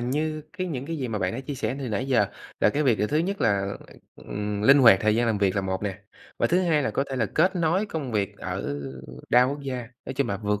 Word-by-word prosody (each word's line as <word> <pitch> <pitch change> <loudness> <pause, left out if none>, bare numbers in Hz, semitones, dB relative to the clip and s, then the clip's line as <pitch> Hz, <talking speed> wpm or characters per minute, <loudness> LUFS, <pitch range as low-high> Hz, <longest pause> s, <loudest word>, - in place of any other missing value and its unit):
như 155 +5 -1
cái 185 -3 -3
những 140 -5 -4
cái 165 -1 -3
gì 130 -3 -3
mà 110 -2 -2
bạn 90 +2 -1
đã 120 - -4
chia 135 +1 -5
sẻ 125 0 -2
từ 135 -3 -4
nãy 115 +5 -2
giờ 120 -6 +3 0.3
là - - +5
cái 150 +5 0
việc, 125 -6 +3
à, 105 - +1
thứ 150 - 0
nhất 195 +4 -1
là, 100 -1 +1 0.4
ừm, 105 0 -4
linh 140 +5 +7
hoạt 115 -8 +8
thời 110 0 +3
gian 120 +1 +2
làm 110 -3 +1
việc 100 -1 +2
là - - +3
một 95 +1 -2
nè. 100 -1 -3 0.4
Và - - +3
thứ 180 +2 +2
hai 155 -4 +2
là - - 0
có 135 - 0
thể 135 - -2
là 115 -4 +1
kết 185 - +2
nối 175 +5 +1
công 145 - -4
việc 100 -2 -1
ở 70 0 -4 0.5
đa 125 +1 +6
quốc 140 +2 -2
gia, 135 -2 -3 0.3
nói 130 - -4
chung 140 +1 0
là 100 - -1
vượt 105 -1 -1
125 Hz, 275 wpm, -25 LUFS, 105-150 Hz, 0.5 s, hoạt